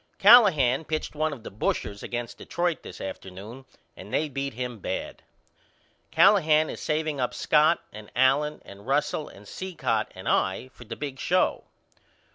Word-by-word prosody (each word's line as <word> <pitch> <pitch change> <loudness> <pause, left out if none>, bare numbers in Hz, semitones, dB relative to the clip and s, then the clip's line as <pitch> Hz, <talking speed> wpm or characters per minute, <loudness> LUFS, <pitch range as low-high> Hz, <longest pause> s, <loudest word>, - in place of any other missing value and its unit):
Callahan 185 - +6
pitched 155 0 -3
one 155 +1 -1
of 130 -6 -8
the - - -8
bushers 100 0 -2
against 120 -1 -5
Detroit 175 -2 -2
this 90 - -10
afternoon 100 +7 -8 0.3
and - - -11
they 155 0 0
beat 140 -2 -4
him 125 -2 -5
bad. - - -5 0.9
Callahan 155 -6 +4
is - - -8
saveing 155 -2 -1
up 125 - -1
Scott 155 +2 +3
and 105 0 -10
Allen 135 +4 +2
and 100 +3 -13
Russell 150 +2 0
and 100 +1 -14
Cicotte 130 - -2
and 95 - -9
I 95 +7 0
for 125 - -15
the 115 +1 -6
big 140 -1 -6
show. 185 +1 +1
135 Hz, 155 wpm, -26 LUFS, 115-155 Hz, 0.9 s, Callahan